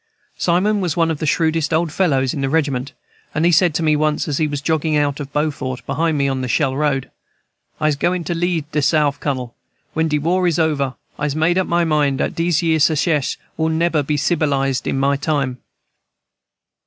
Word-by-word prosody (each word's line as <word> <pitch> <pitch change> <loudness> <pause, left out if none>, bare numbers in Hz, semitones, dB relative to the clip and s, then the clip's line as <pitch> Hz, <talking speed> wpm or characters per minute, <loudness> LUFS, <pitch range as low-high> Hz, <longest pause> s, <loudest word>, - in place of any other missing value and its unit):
Simon 195 +4 +1
was 175 -4 -2
one 165 -1 +2
of 155 - -4
the 155 - -2
shrewdest 160 +1 +1
old 160 0 +1
fellows 135 -7 +1
in 140 - -3
the 135 - 0
regiment, 140 -4 -1 0.4
and 155 +2 +1
he 175 - +5
said 175 +1 +4
to 165 - 0
me 155 -1 +3
once, 150 0 0
as 145 -3 -1
he 155 - +2
was 145 -1 -3
jogging 155 +1 0
out 145 -1 0
of 140 -1 -6
Beaufort 140 -4 -2
behind 155 +3 0
me, 140 -1 +1
on 135 -1 -1
the 130 - -2
Shell 130 +1 +1
Road, 140 -2 -1 0.7
"I'se 155 -2 +1
goin' 175 +3 0
to 170 - -2
leave 170 -2 -1
de 150 - 0
Souf, 145 0 +2
Cunnel, 130 -4 -3 0.4
when 160 0 +1
de 150 -1 +1
war 180 +5 +1
is 170 - +1
over. 145 -5 0 0.2
I'se 150 -1 -1
made 165 +4 +2
up 185 - 0
my 170 0 +2
mind 150 -4 +1
dat - - -1
dese 170 -1 0
yere 160 -1 +2
Secesh 155 -1 +1 0.2
will 160 0 +1
neber 160 -1 +1
be 150 +1 -1
cibilized 140 -5 0
in - - 0
my 140 +1 +2
time." 140 -4 -1
150 Hz, 205 wpm, -19 LUFS, 140-165 Hz, 0.7 s, he